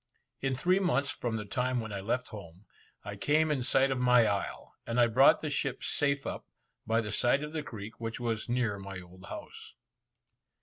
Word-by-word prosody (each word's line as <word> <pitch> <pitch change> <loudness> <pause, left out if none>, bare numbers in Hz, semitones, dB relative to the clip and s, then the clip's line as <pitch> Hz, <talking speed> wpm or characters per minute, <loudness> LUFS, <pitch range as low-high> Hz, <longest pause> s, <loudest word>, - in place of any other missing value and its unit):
In 135 -1 -1
three 180 +8 +2
months 140 -7 +1
from 120 -2 -3
the 105 -2 -4
time 125 +4 -1
when 110 -2 -5
I 100 - -3
left 120 +6 -2
home, 95 -2 -11 0.4
I 100 0 -5
came 155 +8 +2
in 140 -4 0
sight 135 +2 +3
of 130 - -1
my 125 -2 +5
isle, 100 -2 -2
and 115 +1 0
I 120 - +7
brought 125 +4 +5
the 155 - -2
ship 140 -2 -2
safe 140 -1 0
up, - - -4 0.4
by 115 +1 +2
the 105 -2 -5
side 130 +4 +2
of 150 +1 -6
the 155 - -2
creek, 110 -6 -9
which 115 0 -4
was 115 -2 -2
near 120 -5 0
my 95 -1 -7
old 90 +1 -14
house. - - -9
120 Hz, 205 wpm, -30 LUFS, 105-135 Hz, 0.4 s, I